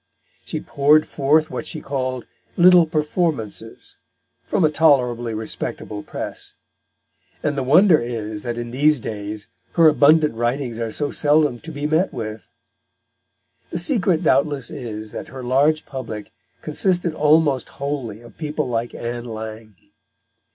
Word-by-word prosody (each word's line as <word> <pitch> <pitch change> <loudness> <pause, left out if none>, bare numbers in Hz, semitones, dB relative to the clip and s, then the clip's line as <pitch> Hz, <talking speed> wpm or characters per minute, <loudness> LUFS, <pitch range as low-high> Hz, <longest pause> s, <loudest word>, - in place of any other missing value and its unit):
She - - -4
poured 150 +2 +3
forth 155 +3 +2
what 155 - -4
she 155 - -5
called 130 -3 -3 0.3
"little 180 -1 +7
Performances" 150 - -2 0.5
from - - +1
a 155 - +2
tolerably 125 -7 +2
respectable 105 -1 -4
press; - - -5 0.9
and 150 -1 0
the 140 - -1
wonder 160 +6 +5
is 110 -3 -4
that 120 +2 -4
in 120 0 -5
these 145 +3 +3
days 105 -1 -6 0.3
her 165 -2 +6
abundant 150 0 +5
writings 120 +1 -2
are 115 -1 -2
so 145 +5 -1
seldom 150 -4 +2
to 160 - -9
be 145 -1 -4
met 160 +5 +2
with. 110 -2 -6 1.2
The - - -3
secret 180 - +1
doubtless 140 -3 +1
is 110 -7 -6
that - - -7
her 130 -1 -9
large 140 +5 +2
public 115 -6 -7 0.3
consisted 175 +2 0
almost 150 -2 +3
wholly 135 -6 -4
of 120 - -16
people 150 -2 -2
like 120 -1 -2
Ann 120 0 -4
Lang. 110 -2 -7
140 Hz, 135 wpm, -21 LUFS, 115-155 Hz, 1.2 s, little